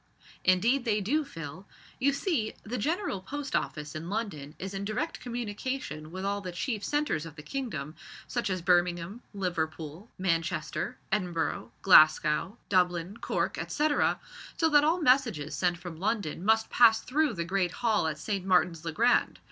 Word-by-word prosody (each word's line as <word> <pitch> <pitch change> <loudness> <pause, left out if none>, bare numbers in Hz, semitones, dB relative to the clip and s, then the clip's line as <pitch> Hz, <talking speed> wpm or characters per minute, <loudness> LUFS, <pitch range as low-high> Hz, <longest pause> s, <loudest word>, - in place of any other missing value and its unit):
"Indeed 230 +9 +3
they 215 -3 +1
do, 280 +11 +1
Phil. 165 - -8 0.3
You 280 +2 +3
see, 275 - -1
the 245 +4 -4
General 320 - -1
Post 285 +7 -4
Office 150 -1 -2
in 160 +2 -6
London 190 -10 -4
is 190 +1 -6
in 195 0 -3
direct 215 +4 -2
communication 235 - -4
with 185 +2 -5
all 200 0 -1
the 185 -2 -5
chief 210 +4 -3
centres 295 - 0
of 165 -2 -9
the 150 - -10
kingdom, 160 - -4 0.3
such 235 -4 -1
as 185 -2 -2
Birmingham, 175 +3 +1
Liverpool, 170 -1 -3
Manchester, 165 -2 -1
Edinburgh, 180 -5 -1
Glasgow, 155 +3 +5
Dublin, 180 +1 +1
Cork, - - -1
etcetera, 300 0 +1 0.4
so 325 - +3
that 295 -1 +6
all 325 +4 +3
messages 230 - +3
sent 175 +3 +1
from 175 -2 -8
London 195 -4 -1
must 220 +2 +3
pass 225 -2 +6
through 295 +1 +1
the 170 -4 -3
great 185 0 0
hall 215 -7 +3
at 155 -1 -2
St. 195 +4 -3
Martin's 180 -3 +2
le 165 - -3
Grand. 235 +9 +2
195 Hz, 160 wpm, -29 LUFS, 165-235 Hz, 0.4 s, that